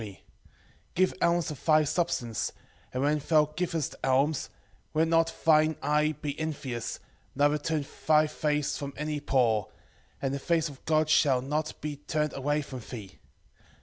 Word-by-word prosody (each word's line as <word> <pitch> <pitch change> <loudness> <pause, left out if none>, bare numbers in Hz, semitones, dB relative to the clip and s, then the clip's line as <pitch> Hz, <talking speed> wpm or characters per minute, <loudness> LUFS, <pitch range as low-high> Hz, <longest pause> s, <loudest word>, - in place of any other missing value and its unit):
4:7 100 -4 -8 0.8
Give 185 +1 +3
alms 170 -2 +2
of 150 - -9
thy 155 -1 +5
substance; 145 -8 -1 0.4
and 130 +1 -1
when 150 +1 +2
thou 155 +1 +3
givest 165 -5 -1
alms, 135 +3 +2 0.5
let 160 +1 +3
not 165 0 +3
thine 155 0 +5
eye 150 +1 +2
be 145 -1 -3
envious, 140 -7 -4 0.4
neither 145 +2 +3
turn 155 -1 -1 0.2
thy 155 0 +6
face 150 -1 -1
from 140 -1 -5
any 150 0 -2
poor, 120 -7 +2 0.5
and 135 -1 -1
the 140 - -2
face 165 +1 +1
of 140 -2 -13
God 155 0 +3
shall 135 -4 +4
not 150 +3 -2
be 150 -1 -4
turned 150 +1 -2
away 145 +2 0
from 130 -2 -7
thee. 110 -5 -9
150 Hz, 155 wpm, -28 LUFS, 140-155 Hz, 0.8 s, thy